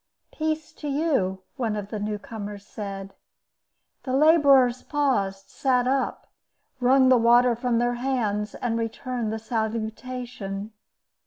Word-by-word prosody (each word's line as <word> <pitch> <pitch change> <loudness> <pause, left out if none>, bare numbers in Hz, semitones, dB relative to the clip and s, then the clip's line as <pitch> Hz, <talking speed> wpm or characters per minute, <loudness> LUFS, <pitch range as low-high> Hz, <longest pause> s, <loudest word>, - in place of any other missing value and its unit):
"Peace 310 0 -2
to 300 - -7
you," 275 - 0
one 230 -5 -1
of 205 -1 -5
the 215 - -4
new 210 0 -2
comers 205 -1 -8
said. 195 -2 -7 0.9
The 255 - -4
laborers 275 -5 +5
paused, 220 -10 -1
sat 250 -2 +1
up, 265 +1 0 0.5
wrung 260 +1 +5
the 255 - +6
water 240 +1 +5
from 240 0 0
their 240 +1 +1
hands, 215 -6 -1
and 230 -1 -1
returned 230 0 -3
the 220 - -2
salutation. 220 -1 -4
240 Hz, 130 wpm, -25 LUFS, 210-260 Hz, 0.9 s, the